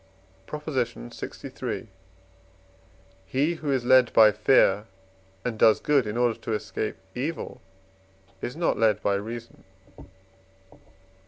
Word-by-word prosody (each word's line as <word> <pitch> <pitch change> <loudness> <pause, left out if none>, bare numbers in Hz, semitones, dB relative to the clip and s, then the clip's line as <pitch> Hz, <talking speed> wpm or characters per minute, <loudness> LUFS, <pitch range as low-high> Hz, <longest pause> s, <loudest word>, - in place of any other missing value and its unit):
PROP. 150 0 -7
LXIII. 120 - -4 1.4
He 145 - +1
who 155 -3 -3
is 130 -3 0
led 130 -1 +5
by 110 -1 +7
fear, 105 -1 +3 0.6
and 115 -3 -3
does 110 - +6
good 140 -6 +2
in 105 +2 -3
order 120 -2 +1
to 115 - -4
escape 110 0 -3 0.2
evil, 145 +7 -4 0.8
is 125 - -4
not 170 +1 0
led 110 -2 +2
by 100 - +2
reason. 115 +4 -6
120 Hz, 110 wpm, -26 LUFS, 110-135 Hz, 1.4 s, by